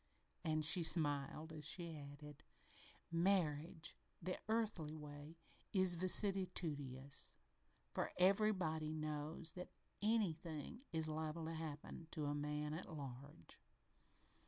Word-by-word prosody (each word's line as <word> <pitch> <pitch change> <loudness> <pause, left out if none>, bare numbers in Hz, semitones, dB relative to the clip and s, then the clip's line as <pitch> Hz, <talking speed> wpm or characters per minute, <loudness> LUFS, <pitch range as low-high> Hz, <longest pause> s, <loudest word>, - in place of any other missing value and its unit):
And 155 -2 +2
she 160 +3 +7
smiled 155 -1 +2
as 155 -1 -7
she 165 +2 -3
added: 145 0 -9 0.7
"Marriage, 165 -2 +1 0.2
the 185 - -2
earthly 210 -9 0
way, 150 +1 -8 0.4
is 185 -2 +6
vicissitudinous, 170 -8 +2 0.6
for - - 0
everybody 180 -5 +3
knows 155 +1 -2
that 180 +2 -7 0.3
anything 190 - 0
is 160 -1 0
liable 155 +1 -2
to 165 - -3
happen 160 0 -5
to 150 - -1
a 145 - +1
man 150 +1 -1
at 170 +2 -5
large." 140 - -8
160 Hz, 110 wpm, -42 LUFS, 150-180 Hz, 0.7 s, she